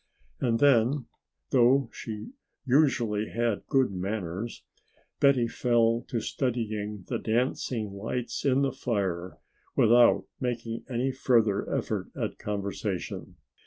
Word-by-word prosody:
And 115 -2 +1
then, 130 0 +4 0.5
though 130 +1 +4
she 110 - -7 0.3
usually 120 -6 +2
had 115 -2 -1
good 135 -6 +2
manners, 95 +2 -4 0.6
Betty 135 -4 +4
fell 115 -1 +2
to 120 - -1
studying 110 -5 -3
the - - -2
dancing 115 -2 -1
lights 115 +5 -4
in 140 0 +3
the 135 - +1
fire 95 -9 -2 0.4
without 120 +2 +5
making 115 -2 -3
any 130 +2 0
further 115 -6 +2
effort - - -2
at - - -3
conversation. 100 -2 -4
115 Hz, 110 wpm, -28 LUFS, 105-125 Hz, 0.6 s, without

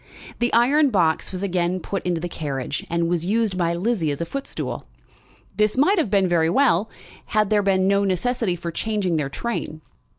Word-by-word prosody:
The 240 +1 +1
iron 275 +5 +4
box 170 -8 +1
was 185 0 -5
again 180 -1 0
put 195 +2 -4
into 175 -2 0
the 175 - -3
carriage, 145 -4 -4
and 170 0 0
was 170 -1 0
used 215 -1 +1
by 170 -2 0
Lizzie 185 -3 0
as 145 - -3
a 170 - -2
footstool. 275 +10 -5 0.7
This 215 +2 +2
might 365 +9 +4
have 300 - 0
been 195 -2 +3
very 165 -2 +2
well, 210 -2 +2 0.4
had 215 -2 +1
there 210 -1 +4
been 190 -1 +2
no 200 0 +3
necessity 200 +1 0
for 170 0 -5
changing 200 -3 -1
their 145 -3 -1
train. 155 -4 -4
190 Hz, 190 wpm, -23 LUFS, 170-220 Hz, 0.7 s, iron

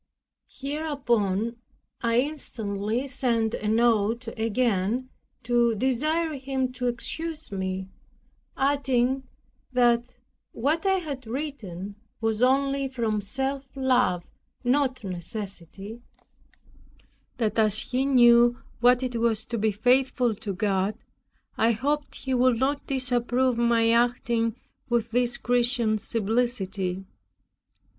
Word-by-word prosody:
Hereupon 240 -7 -1 0.4
I 235 0 +3
instantly 230 -5 -3
sent 235 -4 0
a 210 - -3
note 225 +1 +2
again 225 +1 0 0.3
to 235 -1 +2
desire 305 +8 0
him 265 -2 -2
to 250 0 -3
excuse 315 +6 -4
me, 190 -1 -3 0.7
adding 265 -1 +1 0.4
that 240 -2 +4 0.5
what 310 - 0
I 385 - +4
had 285 -9 -5
written 215 - -5 0.2
was 225 -1 -1
only 275 +1 +2
from 230 -5 -1
self 270 +6 -2
love, 250 -9 +2 0.4
not 260 -1 +1
necessity; 195 +2 -6 1.4
that 220 -2 0
as 215 -1 +3
he 255 +4 -1
knew 240 -2 +6 0.2
what 245 +1 +4
it 250 -2 -2
was 230 -2 0
to 235 - -3
be 215 +1 +2
faithful 250 +2 +2
to 205 0 -5
God, 195 +1 0 0.6
I 230 +1 +4
hoped 290 +6 -2
he 265 - -3
would 250 -1 +3
not 275 +3 -1
disapprove 255 -1 +1
my 230 -1 +3
acting 235 -1 +1 0.3
with 235 -2 0
this 245 0 +1
Christian 240 -3 +2
simplicity. 205 -4 -1
240 Hz, 105 wpm, -26 LUFS, 220-260 Hz, 1.4 s, knew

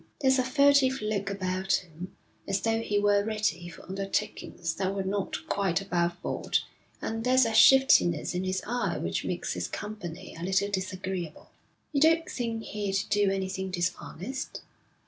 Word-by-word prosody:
There's 265 -2 +3
a - - +3
furtive 270 0 +4
look 210 -2 -2
about 190 -1 -1
him, 180 +2 -3 0.3
as 195 0 0
though 225 0 +1
he 205 -2 -1
were 205 0 +3
ready 215 -5 -1
for 165 - -12
undertakings 190 -3 -3
that 190 +2 -2
were 195 - -1
not 195 +1 -3
quite 195 -4 +1
above 175 -2 -1
board, - - 0 0.5
and 225 0 -3
there's 255 +1 +4
a 225 - -1
shiftiness 220 - +6
in 180 +1 -1
his 185 0 -2
eye 240 +2 -1
which - - -2
makes - - -2
his - - -3
company 210 -6 -7
a 165 - -7
little 190 +2 +1
disagreeable.' 185 -3 -4 0.4
'You 280 - +1
don't 325 +1 +4
think 230 -2 -3
he'd 205 -3 -2
do 205 -1 +3
anything 190 0 -2
dishonest?' 185 +6 -4
195 Hz, 160 wpm, -28 LUFS, 185-225 Hz, 0.5 s, shiftiness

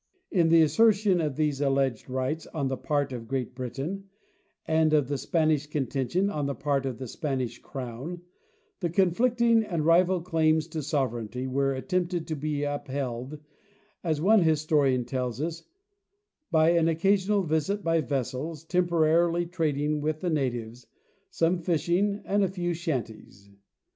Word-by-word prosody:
In 170 -4 +3
the 165 0 +6
assertion 200 +3 +3
of 150 -4 -2
these 150 -2 0
alleged 135 -4 0
rights 130 +5 -2
on 140 -4 0
the 130 - -1
part 145 -1 -1
of 115 -2 -7
Great 130 0 -3
Britain 140 +11 -5 0.6
and 160 -1 +2
of 145 -4 +3
the 145 - -1
Spanish 155 -3 +1
contention 145 - -1
on 150 -8 -2
the 140 - -2
part 140 -1 -1
of 125 -3 -4
the 130 - -6
Spanish 130 -3 -3
crown, 135 +7 -7 0.6
the 175 - -1
conflicting 230 +6 +3
and 170 -7 -2
rival 180 +2 +4
claims 160 -3 +2
to 160 -1 -4
sovereignty 125 -4 -2
were 135 +1 0
attempted 175 +3 -1
to 155 - -3
be 145 0 -2
upheld, 140 -2 -4 0.7
as 160 -4 0
one 205 +5 +5
historian 150 -5 +2
tells 125 -2 -3
us, 165 +2 -4 0.8
"by 160 0 +4
an 170 -1 +3
occa 165 +5 +3
sional 200 0 +1
visit 175 +7 0
by 165 -1 +2
vessels, 140 +3 -3
temporarily 170 0 +2
trading 150 -3 -1
with 155 +1 -2
the 180 - -1
natives, 120 -5 -3 0.4
some 170 +2 +1
fishing, 175 +5 0
and 205 +1 +2
a - - +3
few 175 -2 -2
shanties." 115 - -5
155 Hz, 150 wpm, -27 LUFS, 135-175 Hz, 0.8 s, the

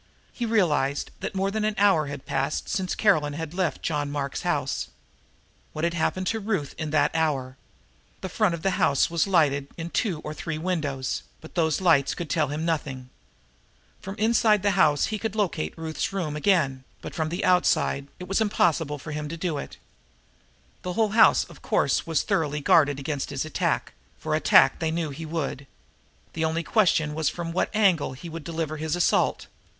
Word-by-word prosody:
He 240 - -3
realized 150 -10 +1
that - - -5
more 195 +1 0
than 215 +1 -1
an 215 0 0
hour 190 -7 +4
had 140 -1 -7
passed 135 +1 -2
since 185 -3 -2
Caroline 155 -9 +2
had 160 +1 -5
left 180 -2 -1
John 145 -3 -1
Mark's 140 -1 -3
house. 145 -6 -1 0.9
What 155 - -4
had 170 0 +1
happened 185 +3 -1
to 225 - -2
Ruth 195 -9 -2
in 155 -1 -3
that 150 -1 +2
hour? 140 -5 0 0.7
The - - -3
front 185 -1 +1
of 160 - -10
the 195 - +2
house 140 -1 +3
was 170 +3 +1
lighted 145 -7 +2
in 165 0 -5
two 190 -10 0
or 150 - -6
three 160 0 -4
windows, 155 -6 -2 0.2
but 160 - -13
those 160 -1 +1
lights 165 -7 +3
could 170 -5 -5
tell 155 -3 +2
him 150 +3 -3
nothing. 135 -6 -3 0.9
From 195 +1 -6
the 215 - -2
inside 225 -1 +4
of 205 - -4
the 205 - +3
house 155 -7 +3
he 215 - -2
could 220 -1 -3
locate 175 - -1
Ruth's 160 +2 -3
room 175 -7 -3
again, 150 -6 +1 0.2
but - - -7
from 160 -1 -1
the 175 +3 -2
outside 180 -6 +2
it 180 - -7
was 195 +4 +1
impossible 165 -8 +1
for 150 - -8
him 150 0 -4
to 165 - -5
do 165 -4 -2
it. - - -8 1.0
The 180 - -4
whole 220 +2 +2
house, 220 +3 +5
of - - -15
course, - - +1
was 165 -2 +1
thoroughly 150 -2 0
guarded 145 -1 +4
against 140 0 -3
his 140 0 -3
attack, 155 - -1 0.2
for - - -3
attack - - +5
they 160 - 0
knew 160 -2 -2
he 160 +3 -7
would. 145 -4 -4 0.7
The 160 - -2
only 160 +1 0
question 155 -6 +2
was 155 -1 0
from 170 -1 -5
what 175 - 0
angle 185 -11 +3
he 150 +7 -9
would 165 -1 -7
deliver 160 -1 -3
his 155 +1 -2
assault. 175 - +1
160 Hz, 195 wpm, -25 LUFS, 145-185 Hz, 1.0 s, house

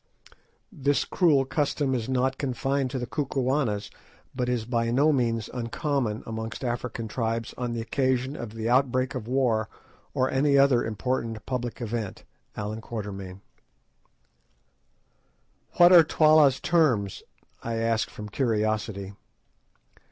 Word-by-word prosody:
This 145 -6 0
cruel 150 -7 +3
custom 145 -1 0
is 120 -1 -2
not 130 0 0
confined 135 0 -1
to 135 - -4
the 125 - -3
Kukuanas, 130 -5 -1 0.4
but 125 -1 -2
is 120 -3 -1
by 115 -1 0
no 145 +6 +3
means 115 -4 0
uncommon 125 -1 -2
amongst 110 +2 -5
African 120 -2 -3
tribes 115 0 -2
on 125 -1 -3
the 115 - -3
occasion 130 +2 0
of 115 -6 -7
the 110 0 -3
outbreak 130 +1 +2
of 120 -4 -5
war 120 -4 +1 0.5
or 130 - +2
any 140 +2 +2
other 135 -3 +4
important 115 -1 -3
public 125 -1 -4
event.—A.Q. 105 -2 -6 2.3
"What 175 0 +7
are 170 -2 +10
Twala's 155 -4 +4
terms?" 130 - +1 0.4
I 115 0 -3
asked 115 0 0
from 105 - -8
curiosity. 110 -4 -1
125 Hz, 120 wpm, -26 LUFS, 110-135 Hz, 2.3 s, are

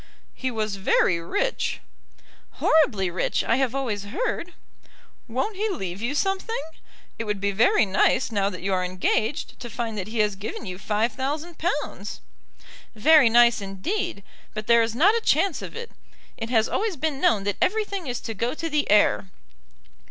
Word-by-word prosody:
"He 260 - -3
was 215 -4 -2
very 185 -2 +2
rich?" 335 - -1 0.7
"Horribly 220 - +2
rich, 180 - 0
I 230 - +2
have 265 -1 0
always 220 -7 -2
heard." 360 - -3 0.7
"Won't 265 - -2
he 430 +2 0
leave 195 - -4
you 250 +5 -1
something? 390 +7 -1 0.6
It 225 - -2
would 210 -1 -2
be 200 +1 0
very 225 +2 +4
nice 195 +5 +2
now 200 -2 +1
that 180 -3 -8
you 195 0 0
are 185 -1 +1
engaged 200 - -1
to 240 - -7
find 230 -1 -4
that 190 - -4
he 225 +2 -6
has 210 -2 +2
given 205 +3 -6
you 185 -1 -6
five 215 +3 0
thousand 300 +6 -4
pounds." 295 - -3 0.8
"Very 285 +3 +6
nice 235 -1 +5
indeed; 200 - -3 0.3
but 215 0 -4
there 235 +1 +5
is 225 0 -1
not 360 - +5
a 465 - 0
chance 390 -6 +2
of - - -8
it. 470 0 -7 0.4
It 225 0 -5
has 225 -3 +3
always 425 -3 -1
been 300 -1 -2
known 205 -3 +3
that 205 -1 -1
everything 400 -5 0
is 245 -1 -2
to 225 - -5
go 235 +6 -2
to 330 +1 -3
the 295 -1 0
heir. 105 - +4
230 Hz, 175 wpm, -25 LUFS, 205-310 Hz, 0.8 s, Very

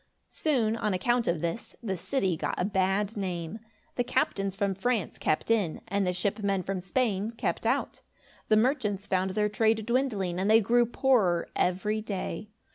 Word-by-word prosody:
Soon, 240 -8 +1
on 210 -4 0
account 240 +5 +1
of 170 -2 0
this, 170 +6 -4
the 195 -4 -1
city 190 +1 0
got - - -2
a 180 - +1
bad 195 +1 0
name. 185 0 -4 0.4
The 245 - +2
captains 195 -4 0
from 200 -1 0
France 210 0 -1
kept 155 - 0
in, 200 -8 +1
and 200 -1 0
the - - +2
ship 200 +4 -1
men 195 -2 0
from 195 0 -2
Spain 205 +1 0
kept 230 - -2
out. - - -1 0.5
The 215 - +4
merchants 215 -5 +1
found 190 -1 0
their 210 -1 +2
trade 220 +1 +1
dwindling, 215 -8 0
and 195 +2 +1
they 220 +1 +7
grew 240 +2 +3
poorer 220 -9 +2
every 210 +4 0
day. 205 -1 -4
205 Hz, 175 wpm, -28 LUFS, 185-225 Hz, 0.5 s, they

